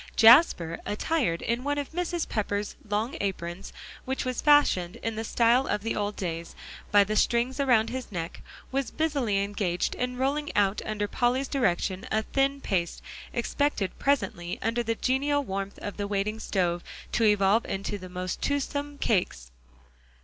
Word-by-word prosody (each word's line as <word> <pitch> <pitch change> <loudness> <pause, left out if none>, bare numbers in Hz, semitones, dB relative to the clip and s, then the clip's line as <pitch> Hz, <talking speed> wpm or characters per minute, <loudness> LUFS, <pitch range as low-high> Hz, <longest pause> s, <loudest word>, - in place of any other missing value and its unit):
Jasper, 225 - +6
attired 210 - -1
in 235 +2 -1
one 290 +1 -1
of 285 -1 -3
Mrs. 345 0 -2
Pepper's 205 -1 -2
long 215 +5 -1
aprons, 190 -1 -4 0.3
which 265 0 -3
was 255 -2 -2
fastened 285 - +4
in 225 -1 -2
the 220 - -3
style 235 +3 +3
of 210 0 -1
the 225 - -1
old 205 0 -2
days, 170 -2 -4 0.4
by 205 -1 +7
the 210 +2 -2
strings 240 +5 +1
around 235 -5 +3
his 260 -2 -5
neck, 170 -3 -5 0.3
was 270 -2 -1
busily 270 -11 0
engaged 200 -3 -1
in 250 0 -3
rolling 285 +3 0
out 200 0 +2
under 210 -1 -1
Polly's 250 +5 +1
direction, 195 -4 0
a 220 0 +1
thin 275 +3 0
paste, 175 -7 -2 0.3
expected 240 -4 -1
presently 190 -11 0
under 230 +2 +1
the 230 -1 -1
genial 285 +4 +1
warmth 195 -3 -4
of 205 - -5
the 205 -1 -2
waiting 205 +2 -1
stove, 175 -5 -1 0.3
to 235 - +1
evolve 210 +1 +4
into 195 -1 -4
most 180 0 -4
toothsome 285 0 -2
cakes. 70 - 0
220 Hz, 155 wpm, -27 LUFS, 195-265 Hz, 0.4 s, by